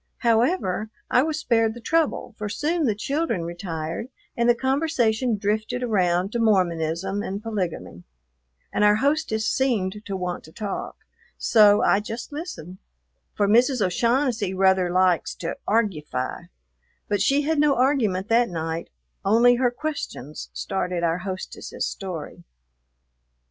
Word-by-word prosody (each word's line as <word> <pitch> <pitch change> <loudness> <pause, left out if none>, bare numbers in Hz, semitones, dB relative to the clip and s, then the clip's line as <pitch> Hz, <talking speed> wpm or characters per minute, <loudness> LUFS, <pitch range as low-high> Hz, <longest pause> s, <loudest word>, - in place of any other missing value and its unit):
However, 230 - +1 0.2
I 250 - +5
was 310 +2 -1
spared 225 -6 +1
the - - -8
trouble, 310 -1 0
for 210 -1 -3
soon 310 +9 0
the 220 -5 +1
children 275 - -1
retired 170 +2 -5 0.3
and 235 0 +2
the 240 - +5
conversation 255 -4 +1
drifted 215 +5 -1
around 185 -4 +1
to 235 - -2
Mormonism 185 -2 +1
and 200 +1 -5
polygamy; 185 - -4 0.7
and - - +1
our 210 0 +6
hostess 270 -4 0
seemed 210 -7 0
to 195 -2 -4
want 180 -1 -4
to 160 - -14
talk, 205 +2 -5 0.4
so 210 -2 +5
I 200 - +4
just 225 +5 -6
listened, 285 - -7 0.6
for 205 - +2
Mrs. 245 +5 +4
O'Shaughnessy 230 +1 +1
rather 190 -1 +3
likes 180 -1 +2
to 165 - -4
"argufy"; 160 - -1 0.6
but 205 -2 0
she 280 +7 +3
had 315 +1 0
no 295 -2 +4
argument 235 -8 +1
that 235 +1 +3
night, 165 -1 -4 0.3
only 235 +4 +5
her 250 0 +3
questions 245 - -5
started 180 -3 -3
our 165 +1 +1
hostess's 185 0 -5
story. 180 -6 -6
210 Hz, 135 wpm, -24 LUFS, 185-245 Hz, 0.7 s, our